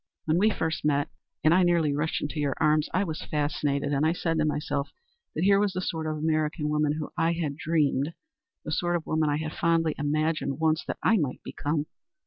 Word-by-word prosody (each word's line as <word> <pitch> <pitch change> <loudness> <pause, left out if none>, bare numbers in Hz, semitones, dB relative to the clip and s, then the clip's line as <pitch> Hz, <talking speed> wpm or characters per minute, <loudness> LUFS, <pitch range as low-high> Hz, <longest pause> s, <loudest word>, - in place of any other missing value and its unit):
"When 160 +2 +2
we 210 - +4
met - - -3
first 160 0 -1
and 150 +2 0
I 185 - +5
nearly 170 -4 +3
rushed 150 +3 -1
into 150 +1 -3
your 145 -2 0
arms, 155 -1 +3
I 185 - +1
was 160 -5 -4
fascinated, 145 -1 -1
and 140 +1 +1
I 160 +1 +3
said 165 -2 -1
to 155 - +2
myself 145 -2 -1 0.5
that 160 - -1
here 200 +1 +5
was 205 -2 +1
the 185 - -2
sort 160 -3 -3
of 155 0 -2
American 155 0 0
woman 150 0 +1
of - - -5
whom 155 - -4
I 165 +1 +3
had 160 -4 -2
dreamed 150 -1 0 0.5
the 155 - -4
sort 175 +3 0
of 165 - -2
woman 155 -1 +1
I 145 - +1
had 155 0 -4
fondly 165 -2 +2
imagined 155 -1 0
once 160 0 +2
that - - -3
I 225 - +4
might 145 -8 -2
become. 145 0 -2
155 Hz, 220 wpm, -27 LUFS, 150-165 Hz, 0.5 s, I